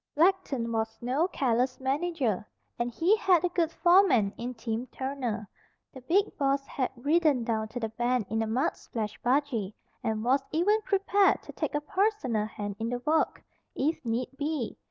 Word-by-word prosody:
Blackton 300 -8 +2
was 225 0 -2
no 265 +8 +1
careless 255 -5 0
manager, 270 - 0 0.4
and 240 0 0
he 335 - +3
had 375 -5 +3
a - - +1
good 340 -2 0
foreman 340 - +4
in 245 +2 -5
Tim 230 +2 -3
Turner. 255 -7 -4 0.5
The 260 - -10
big 385 +11 +1
boss 275 0 +1
had 260 -2 -2
ridden 290 0 +2
down 220 -1 -1
to 235 +3 -6
the 225 -2 -2
bend 240 0 0
in 220 +3 -1
a 225 - -1
mud 260 +10 0
splashed 215 -3 -5
buggy, 245 -6 0 0.3
and 220 -1 -1
was 265 +3 +3
even 410 +7 +2
prepared 400 -1 +2
to - - -9
take - - -3
a 295 - 0
personal 295 - 0
hand 205 -2 -6
in 225 +1 -2
the 245 - -1
work, 315 +1 +1 0.3
if 300 +4 -1
need 235 +1 -1
be. 290 -5 -2
260 Hz, 175 wpm, -28 LUFS, 230-325 Hz, 0.5 s, foreman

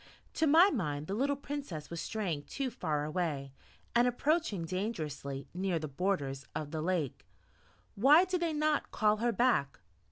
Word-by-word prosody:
To 320 - +2
my 335 +7 +7
mind 150 - -2
the 190 - -4
little 275 +6 +1
Princess 275 - -6
was 170 - -4
straying 175 -10 -3
too 270 -2 -3
far 150 -10 -2
away, 150 -4 -2 0.4
and 240 +1 +4
approaching 245 - 0
dangerously 155 - -4
near 185 -1 0
the 155 -1 -4
borders 140 -4 -2
of 150 -1 -4
the 160 -1 -3
lake. 165 -5 -1 0.7
Why 290 - +6
did 365 -1 -1
they 335 -1 +1
not 305 0 +1
call 215 -1 +2
her 235 +2 +1
back? 225 - +1
190 Hz, 160 wpm, -32 LUFS, -, 0.7 s, my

